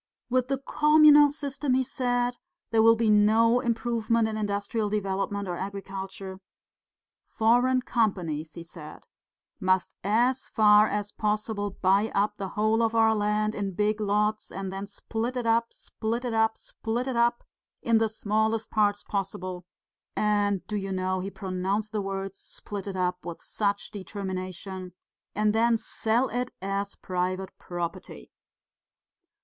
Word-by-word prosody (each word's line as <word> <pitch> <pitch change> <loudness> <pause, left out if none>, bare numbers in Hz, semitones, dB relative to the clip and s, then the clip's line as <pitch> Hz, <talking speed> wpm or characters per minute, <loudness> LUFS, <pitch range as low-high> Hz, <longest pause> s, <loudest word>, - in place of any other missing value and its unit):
'With 255 0 +2
the 275 0 0
communal 300 +1 +6
system,' 280 -2 -2
he 260 - +2
said, 245 -1 -1 0.3
'there 225 -1 +4
will 230 +1 +7
be 225 -1 +2
no 220 +3 +5
improvement 230 -1 0
in 220 - -3
industrial 205 +1 -1
development 200 -1 -2
or 175 - -2
agriculture. 195 -1 -6 0.9
Foreign 245 +3 +3
companies,' 175 -11 -1
he 170 - -7
said, 165 -2 -11 0.5
'must 185 0 +1
as 240 +6 +2
far 210 -1 +5
as 205 -1 -2
possible 210 -1 -1
buy 195 +4 +3
up 210 +1 +1
the 195 - -3
whole 215 +2 +3
of 230 0 +1
our 225 -1 +5
land 210 0 0
in 195 -3 -3
big 210 +2 +1
lots, 210 +1 0
and 190 0 -5
then 195 +1 -5
split 225 +4 -4
it 245 - -2
up, 230 0 +2
split 230 +3 -4
it 240 - -2
up, 220 0 +2
split 235 +3 -4
it 260 - -2
up, 235 0 +2 0.4
in 230 -1 +4
the 225 -1 +2
smallest 220 +1 -1
parts 205 -1 +2
possible' 185 -3 -4 0.5
and 205 -2 +1
do 210 - -3
you 195 -1 -4
know 185 0 -1
he 190 +2 -4
pronounced 195 +2 -2
the 215 -2 -1
words 195 0 -4
'split 205 -1 -7
it 195 - -4
up' 180 -1 -1
with 170 -1 -7
such 200 -1 -2
determination 185 -2 -6 0.4
'and 210 +1 +2
then 230 +1 +3
sell 225 +3 0
it 250 0 -2
as 200 +1 -3
private 185 +1 -3
property. 175 +1 -6
210 Hz, 145 wpm, -27 LUFS, 195-230 Hz, 0.9 s, will